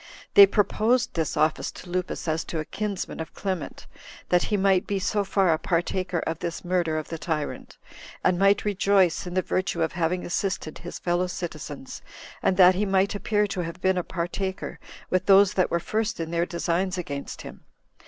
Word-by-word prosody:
They 200 -1 +10
proposed 220 +4 +1
this 160 -3 -2
office 155 +1 +1
to - - -11
Lupus 180 0 -3
as 160 +1 0
to 165 - -4
a 155 - -2
kinsman 200 0 -4
of 160 - -7
Clement, 190 -5 -4 0.4
that 180 0 +4
he 210 - 0
might 190 -1 +2
be 200 - 0
so 205 +2 0
far 195 -3 +2
a 155 - -1
partaker 180 +2 -1
of 160 0 -3
this 170 +1 -5
murder 175 -3 0
of 155 - -5
the 165 - -5
tyrant, 155 -4 -4 0.5
and 175 - +2
might 200 +1 +4
rejoice 195 -3 +2
in 180 - -6
the 185 - +2
virtue 180 -3 -1
of 160 - -1
having 175 +1 -1
assisted 175 -3 -2
his 175 - -7
fellow 175 +1 0
citizens, 155 -6 -6 0.4
and 185 - +1
that 185 -1 +8
he 190 +3 -1
might 195 +1 +2
appear 210 +1 +1
to 195 -2 -4
have 170 +1 -6
been 190 0 +2
a - - -2
partaker 185 +3 -4 0.3
with 185 0 +1
those 195 -1 +6
that 185 - +2
were 170 - +1
first 215 +3 -2
in 165 0 -4
their 170 +1 0
designs 180 +2 -1
against 140 -5 -5
him. - - -10
180 Hz, 195 wpm, -25 LUFS, 170-195 Hz, 0.5 s, They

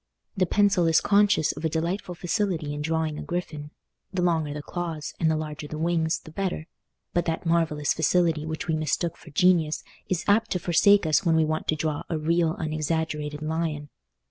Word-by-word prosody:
The 185 -3 +1
pencil 200 -3 +3
is 165 -1 +5
conscious 205 -5 +3
of - - -9
a 160 - +1
delightful 175 +3 -2
facility 175 -4 -1
in 145 - -4
drawing 160 -1 -1
a - - -5
griffin—the 170 +2 -6
longer 160 -4 +1
the 145 0 -5
claws, 165 -4 -4
and 160 - +2
the 160 - +2
larger 150 -1 -5
the 155 - -6
wings, 160 0 +1
the 155 - -13
better; 180 -2 -3 0.5
but 175 -1 +1
that 165 +1 -2
marvellous 165 -3 +1
facility 165 -1 +2
which 160 +1 -4
we 160 - +1
mistook 155 +2 -1
for 160 - -15
genius 160 0 +2 0.3
is 180 -3 -1
apt 215 +2 +3
to 180 - -1
forsake 195 +3 +4
us 155 +5 +3
when 165 -3 +3
we 160 -1 +4
want 155 0 -2
to 155 - +2
draw 155 -1 -2
a 165 - -1
real 165 +1 +1
unexaggerated 155 -1 -2
lion. 155 -2 -2
160 Hz, 190 wpm, -26 LUFS, 155-175 Hz, 0.5 s, is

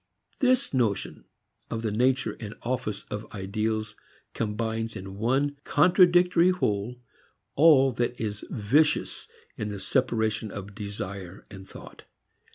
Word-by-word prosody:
This 255 - +2
notion 115 -6 -1 0.4
of 115 0 -4
the 110 - -1
nature 130 +5 +1
and 110 -1 -7
office 115 -5 -3
of 105 +1 -6
ideals 110 +2 -2 0.4
combines 110 +1 -2
in 95 0 -8
one 135 +5 +1
contradictory 180 +1 +5
whole 120 - -1 0.5
all 140 -3 +6
that 120 0 -2
is 105 -1 -4
vicious 145 +9 +1 0.3
in 105 - -3
the 100 -1 -5
separation 110 -3 0
of 100 0 -8
desire 100 -3 -7
and 95 -1 -11
thought. - - -12
110 Hz, 120 wpm, -27 LUFS, 105-135 Hz, 0.5 s, all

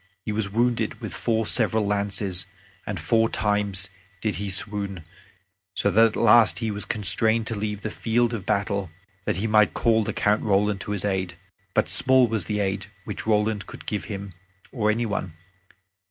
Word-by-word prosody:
He - - -2
was 105 -1 -1
wounded 115 -1 0
with 110 -4 -6
four 115 -1 0
several 110 -1 +2
lances, 100 -3 -1 0.4
and 100 -3 -3
four 115 +8 +2
times 105 -2 0 0.3
did 105 -4 -2
he 100 +1 -3
swoon, 100 -2 -1 0.7
so 100 - +1
that 115 +2 +6
at 110 - -5
the - - -2
last 115 -1 +6
he 115 -2 -2
was 105 0 -4
constrained 110 +2 +2
to 115 - -3
leave 105 0 -3
the 110 - -4
field 120 +1 0
of 110 -5 -4
battle, 100 -1 -1 0.4
that - - -1
he 100 - -2
might 105 -1 +3
call 115 -2 +3
the - - -2
Count 105 +1 +1
Roland 100 -1 +1
to - - -4
his 100 -1 -3
aid. 95 -3 -1 0.4
But - - +3
small 130 -1 +5
was 110 -4 -1
the 105 -1 -1
aid 100 +1 -2 0.2
which - - -6
Roland 105 -2 +1
could - - -11
give 105 -2 -3
him 100 -2 -6 0.4
or 105 -4 0
any 115 +2 +1
one. 100 -5 -3
105 Hz, 185 wpm, -24 LUFS, 100-110 Hz, 0.7 s, that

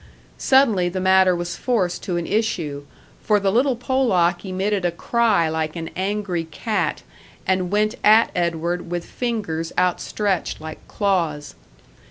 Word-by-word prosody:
Suddenly 225 -10 +3
the 185 +1 -4
matter 190 -1 +4
was 175 0 -4
forced 215 -8 -1
to 180 -3 -2
an 170 - -2
issue, 165 -10 -2 0.4
for 210 -1 +2
the 195 -1 +1
little 255 +4 +2
Polack 210 -9 +1
emitted 195 +1 -1
a 175 - +2
cry 205 0 +1
like 160 0 -2
an 165 -1 -5
angry 190 -3 -2
cat, 185 +1 -2 0.4
and 185 -1 0
went 210 +2 +1
at 220 +2 +6
Edward 170 0 -1
with 175 -1 -3
fingers 200 -10 -3
outstretched 180 +1 0
like 155 0 -8
claws. 170 -8 -1
185 Hz, 140 wpm, -22 LUFS, 170-210 Hz, 0.4 s, at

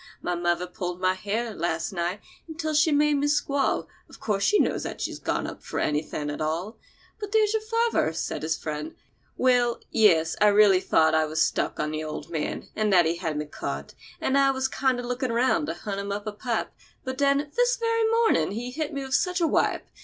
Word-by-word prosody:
My 180 - -2
mother 175 0 0
pulled 180 0 -5
my 185 0 +2
hair, 215 +4 -3
last 165 +1 -2
night, 180 +2 -2 0.3
until 315 -1 -3
she 305 +1 +4
made 295 0 +3
me 285 +1 +1
squall. 285 -1 +1 0.2
Of - - -14
course 205 -3 -1
she 420 - +4
knows - - +1
that - - -6
she's - - -4
gone - - -1
up - - -7
for - - -4
anything 150 0 -1
at 145 - -6
all." 165 +8 -3 0.4
"But 415 -2 -6
there's 435 -1 +3
your 440 - +1
father," 455 - +1
said 160 - -4
his 160 +1 -1
friend. 150 0 -5 0.4
"Well,—yes—I 220 -8 +3
really 205 -2 +6
thought 160 -3 +3
that 160 0 +3
I - - +1
was 155 +1 +1
stuck - - -1
on 150 - -1
the 155 0 -3
old 155 +1 -6
man, 155 -3 -3
and 215 -1 +1
that 175 -3 +6
he 165 +1 0
had 160 -4 -3
me 150 - -2
caught, 70 - -6 0.3
and 275 +1 +2
I 275 0 +5
was 265 -1 0
kinder 260 -2 0
looking 250 +1 -2
round 260 +7 +2
to - - -3
hunt 200 -2 -5
him 200 0 -4
up 205 +1 -4
a 215 - -3
pipe; 225 +2 -3 0.3
but 260 +1 -5
then, 280 +1 +2
this - - +3
very 460 -2 +1
mornin' 450 - +2
he 245 +3 -4
hit 310 +3 -3
me 270 -1 -5
such 360 +5 +1
a 340 - +2
wipe! - - +1
215 Hz, 215 wpm, -26 LUFS, 170-285 Hz, 0.4 s, really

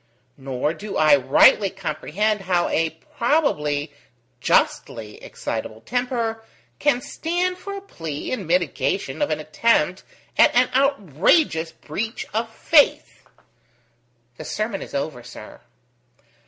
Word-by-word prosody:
Nor 135 +2 -2
do 210 +3 -6
I 155 -2 +6
rightly 140 +9 +5
comprehend 195 +4 -2
how 180 -2 +1
a 165 0 +1 0.3
probably 150 - +1 0.5
justly 110 -2 0
excitable 110 +1 -5
temper 235 - -2 0.4
can 270 -4 +2
stand 355 +6 -2
for 400 0 -6
a - - -7
plea 160 - -6
in 205 -9 -3
mitigation 180 - 0
of 295 - +1
an - - -1
attempt 175 +2 +1 0.4
at - - +6
an 250 +1 +4
outrageous 205 - +2
breach 220 +10 -5
of 225 +1 -1
faith." 290 +6 +2 1.1
"The - - -7
sermon 215 -2 -3
is - - -8
over, 140 -2 -3
sir." - - -12
195 Hz, 115 wpm, -22 LUFS, 150-245 Hz, 1.1 s, I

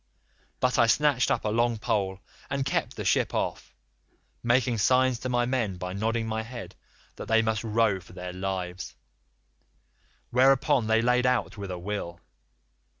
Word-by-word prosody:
But 125 0 +1
I 115 - +5
snatched 145 0 +3
up - - 0
a - - +1
long 115 +1 +1
pole 95 -3 -1 0.3
and 140 -1 -1
kept 140 - -1
the - - -5
ship - - +1
off, - - -3 0.7
making 120 -1 +2
signs 130 +2 +3
to 130 - -4
my 120 -1 +1
men 120 -7 -1
by 90 0 -5
nodding 115 +3 -1
my 110 0 -2
head, 120 +1 -8 0.4
that - - -7
they 115 0 +3
must 110 0 -1
row 110 -3 +1
for 90 - -16
their 90 -1 -7
lives, 95 -1 -4 1.4
whereon 130 -2 +3
they 110 +1 +3
laid 125 +1 +3
out 125 -1 0
with 100 -2 -7
a 90 - -4
will. 90 -2 -5
115 Hz, 160 wpm, -27 LUFS, 100-125 Hz, 1.4 s, I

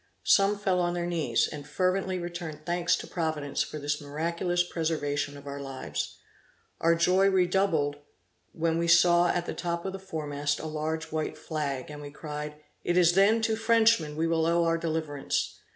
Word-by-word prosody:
Some 200 +1 +4
fell 190 -3 +1
on 175 0 0
their 175 0 -1
knees, 160 -9 +1
and 145 -1 -8
fervently 185 +3 0
returned 170 -3 -6
thanks 175 +1 +2
to - - -6
Providence 155 -4 -2
for - - -3
this 145 0 -2
miraculous 170 +4 -1
preservation 145 -4 -2
of 140 - -12
their 140 0 -6
lives. 130 - -5 0.6
Our 165 0 +4
joy 185 +3 +4
redoubled 180 -6 +2 0.5
when 165 +1 0
saw 175 +1 +6
we - - 0
at 175 - -2
the - - -4
top 170 0 -3
of 190 - -3
the 195 - -6
fore 165 -5 -5
mast 145 0 -1
a - - -6
large 160 +1 -3
white 155 0 -2
flag, 150 -4 -4
and 150 0 -8
we 145 - -7
cried, 150 0 -6 0.3
'It 175 +1 +1
is 175 -1 +5
then 210 +4 +4
to 225 -1 +2
Frenchmen 220 -8 +3
we 160 +2 0
will 165 -1 +1
owe 170 0 +3
our 165 0 +1
deliverance.' 155 -4 -2
165 Hz, 185 wpm, -28 LUFS, 150-175 Hz, 0.6 s, saw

